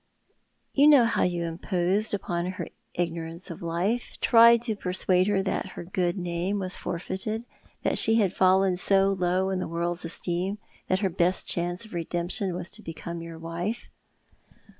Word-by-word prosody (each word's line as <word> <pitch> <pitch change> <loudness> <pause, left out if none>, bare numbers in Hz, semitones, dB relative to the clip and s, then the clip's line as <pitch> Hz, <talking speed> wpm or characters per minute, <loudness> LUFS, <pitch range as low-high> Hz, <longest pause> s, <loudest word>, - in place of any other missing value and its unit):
"You 285 +2 +6
know 285 -6 +7
how 230 - +1
you 175 -1 +1
imposed 180 +5 0
upon 175 -1 -3
her - - -5 0.3
ignorance 170 +1 -3
of 165 - -9
life, 175 +8 -2
tried 235 0 +6
to 225 -3 -1
persuade 185 -1 +1
her 200 -2 +2
that 190 - -2
her - - -7
good 175 +1 -1
name 175 +2 -2
was 185 -2 -3
forfeited, 190 +6 -4 0.4
that - - +2
she 225 - +5
had 200 -5 +2
fallen 190 0 +4
so 195 +1 +3
low 185 0 0
in 190 - -1
the - - -3
world's 170 +1 -2
esteem 175 +3 -2 0.3
that 185 +2 +1
her 195 - +2
best 175 +2 +1
chance 175 +4 -1
of 220 - -14
redemption 175 +2 -2
was 180 - -5
to 215 +2 -6
become 170 -1 -6
your 165 0 -8
wife." 170 +8 -4
185 Hz, 165 wpm, -27 LUFS, 170-200 Hz, 0.4 s, know